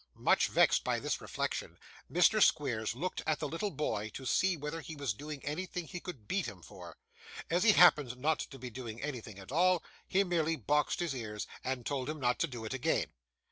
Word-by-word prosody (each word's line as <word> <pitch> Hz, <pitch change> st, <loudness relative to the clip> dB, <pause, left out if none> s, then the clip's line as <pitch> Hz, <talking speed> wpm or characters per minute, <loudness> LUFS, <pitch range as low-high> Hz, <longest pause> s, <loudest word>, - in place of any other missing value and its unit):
Much -, -, +3 dB
vexed -, -, +4 dB
by -, -, 0 dB
this -, -, -2 dB
reflection, -, -, -3 dB, 0.3 s
Mr. 180 Hz, +5 st, +5 dB
Squeers 120 Hz, -, +2 dB
looked 180 Hz, +8 st, -3 dB
at 155 Hz, -1 st, +2 dB
the 150 Hz, -, -3 dB
little 165 Hz, +8 st, -2 dB
boy 130 Hz, -, -2 dB
to 130 Hz, -, -6 dB
see 185 Hz, +6 st, +2 dB
whether 150 Hz, +3 st, -4 dB
he 160 Hz, +1 st, -8 dB
was 140 Hz, -6 st, -1 dB
doing 145 Hz, +5 st, -8 dB
anything 175 Hz, +3 st, -3 dB
he 180 Hz, -, -6 dB
could 140 Hz, -, -9 dB
beat 195 Hz, -, 0 dB
him 95 Hz, -4 st, -9 dB
for. -, -, -11 dB, 0.5 s
As 175 Hz, +2 st, +3 dB
he 215 Hz, -1 st, +7 dB
happened 150 Hz, -9 st, +6 dB
not 150 Hz, +4 st, +1 dB
to 135 Hz, -, -6 dB
be 125 Hz, -1 st, -7 dB
doing 115 Hz, -2 st, -7 dB
anything 125 Hz, -7 st, -5 dB
at 95 Hz, +4 st, -10 dB
all, 180 Hz, +3 st, +3 dB, 0.2 s
he 195 Hz, +1 st, +3 dB
merely 165 Hz, -3 st, +1 dB
boxed 150 Hz, -, +1 dB
his 170 Hz, -5 st, -1 dB
ears, 110 Hz, -4 st, -4 dB, 0.2 s
and 130 Hz, -2 st, -3 dB
told 135 Hz, -2 st, -2 dB
him 155 Hz, 0 st, -4 dB
not 125 Hz, -2 st, +1 dB
to 165 Hz, -, +2 dB
do 120 Hz, -6 st, -7 dB
it 110 Hz, -, -4 dB
again. 135 Hz, -, 0 dB
150 Hz, 210 wpm, -33 LUFS, 125-165 Hz, 0.5 s, he